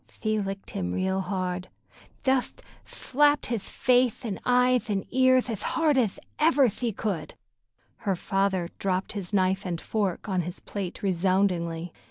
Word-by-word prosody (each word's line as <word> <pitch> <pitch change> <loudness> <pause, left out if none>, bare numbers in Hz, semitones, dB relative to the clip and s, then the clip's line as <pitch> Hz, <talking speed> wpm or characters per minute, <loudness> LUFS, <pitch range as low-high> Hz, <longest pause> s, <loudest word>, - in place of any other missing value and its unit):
"Thshe 215 -1 -2
licked 195 0 -6
him 90 -1 -2
real 190 - 0
hard—jetht 185 +7 -3 0.2
thlapped 290 +2 +2
hith 230 -4 -2
fathe 250 +3 +1
an' 200 -5 -3
eyeth 250 -1 +3
an' 195 -2 -1
earth 255 -1 +5
eth 220 -4 -3
hard 315 +2 +2
eth 235 -7 +1 0.2
ever 300 -4 +5
thshe 225 0 -3
could." 170 -8 -3 0.6
Her 195 -3 -1
father 190 -1 0
dropped 190 -1 -1
his 200 -3 -5
knife 190 -1 +2
and 175 -3 -3
fork 200 -3 -2
on 185 -3 +1
his 175 +2 -6
plate 195 -2 -6
resoundingly. 180 -3 +1
195 Hz, 145 wpm, -27 LUFS, 185-245 Hz, 0.6 s, earth